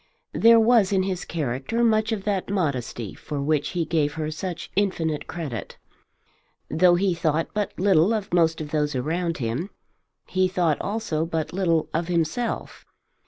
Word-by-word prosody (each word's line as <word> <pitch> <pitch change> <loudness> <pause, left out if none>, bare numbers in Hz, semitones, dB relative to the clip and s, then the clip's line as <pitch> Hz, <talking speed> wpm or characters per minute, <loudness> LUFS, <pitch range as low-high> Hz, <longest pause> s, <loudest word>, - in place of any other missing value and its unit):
There 230 0 +6
was 225 -3 +4
in 190 -1 +2
his 185 -2 -3
character 150 - -2
much 220 -1 +2
of 210 -3 -2
that 195 -3 -1
modesty 130 - -2
for 145 - -6
which 145 +1 0
he 170 - +1
gave 150 -2 0
her 155 -1 -3
such 170 +2 -5
infinite 170 -6 0
credit. 150 - -6 0.9
Though 175 +3 +5
he 190 +1 +2
thought 165 -1 0
but 210 -2 -3
little 190 0 +4
of 215 -4 -2
most 165 -2 +3
of 150 -1 -6
those 150 -2 0
around 165 +6 -1
him, 125 - -2 0.6
he 185 0 +1
thought 175 -5 0
also 200 -7 -2
but 165 -1 -3
little 170 -4 +1
of 165 +1 -1
himself. 175 +7 -2
170 Hz, 160 wpm, -24 LUFS, 155-195 Hz, 0.9 s, There